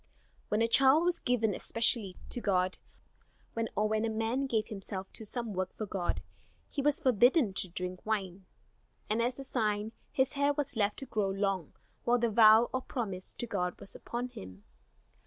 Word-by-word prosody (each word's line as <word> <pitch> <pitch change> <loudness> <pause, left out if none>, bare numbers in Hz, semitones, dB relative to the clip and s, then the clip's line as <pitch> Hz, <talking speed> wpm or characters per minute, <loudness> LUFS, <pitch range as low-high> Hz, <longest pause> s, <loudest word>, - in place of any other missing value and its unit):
When 215 +2 +2
a - - +3
child 270 +6 +5
was 350 -1 +1
given 230 -4 +1
especially 220 -2 +1
to 245 - -3
God, 185 -3 +1 1.0
or 215 +1 +2
when 215 0 0
a 230 - +1
man 225 +5 -1
gave 225 -3 0
himself 195 -2 -6
to 220 - -7
some 235 -1 -4
work 185 0 -2
for 215 - -3
God, 190 -3 -2 0.5
he 285 - -2
was 290 0 +3
forbidden 245 - +4
to 185 - +2
drink 180 +1 -5
wine, 195 -3 -3 0.7
and 220 +2 +2
as 245 +1 0
a 275 - -6
sign, 215 -4 -1 0.2
his 265 +1 +1
hair 285 0 +2
was 285 -2 -2
left 210 -1 +1
to 270 - -6
grow 210 -5 -1
long 195 -4 -1 0.3
while 240 +1 +3
the 235 -1 +1
vow 220 +1 +7
or 260 - 0
promise 195 -8 -5
to 240 - -3
God 180 -6 -2
was - - -9
upon 245 +1 -5
him. 95 - -11
220 Hz, 180 wpm, -31 LUFS, 195-245 Hz, 1.0 s, vow